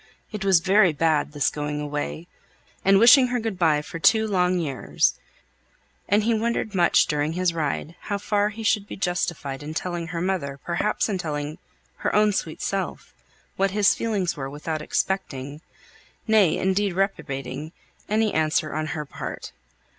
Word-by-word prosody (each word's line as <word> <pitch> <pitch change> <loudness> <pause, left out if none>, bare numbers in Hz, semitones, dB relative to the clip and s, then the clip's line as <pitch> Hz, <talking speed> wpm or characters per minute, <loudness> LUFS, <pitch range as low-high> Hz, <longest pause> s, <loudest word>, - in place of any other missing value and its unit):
It 210 -2 -5
was 190 -4 +4
very 190 -1 +4
bad, 155 -1 +1
this 145 -2 +1
going 150 0 -3
away, 150 +2 -4 0.6
and 195 0 +5
wishing 250 +4 +7
her 245 0 -1
good 220 -5 -4
by 155 -4 +3
for 165 - -7
two 220 +6 +4
long 180 -3 +1
years; 135 - 0 1.0
and 205 +2 +3
he 230 +2 +2
wondered 225 -1 -1
much 175 -3 +4
during 150 +1 -1
his 180 0 0
ride 160 0 -2
how 205 - -3
far 205 0 0
he 220 +1 -8
should 210 -2 +1
be - - -7
justified 170 -7 -2
in 155 +2 -7
telling 175 -1 -3
her 170 0 -4
mother, 165 -7 -2
perhaps 175 +5 0
in 200 -4 -2
telling 150 -2 -4 0.4
her - - -1
own 210 0 +4
sweet 165 -5 -3
self, 195 -1 -3 0.4
what 195 +1 +2
his 200 -1 +3
feelings 200 -6 -1
were 135 -3 -5
without 150 +2 -4
expecting, 150 -5 -2 0.7
nay, 215 -7 +4
indeed 190 0 +1
reprobating, 150 -7 -3 0.4
any 215 0 +1
answer 155 +1 +1
on 155 0 -2
her 150 - -4
part. - - -7
175 Hz, 160 wpm, -24 LUFS, 150-205 Hz, 1.0 s, wishing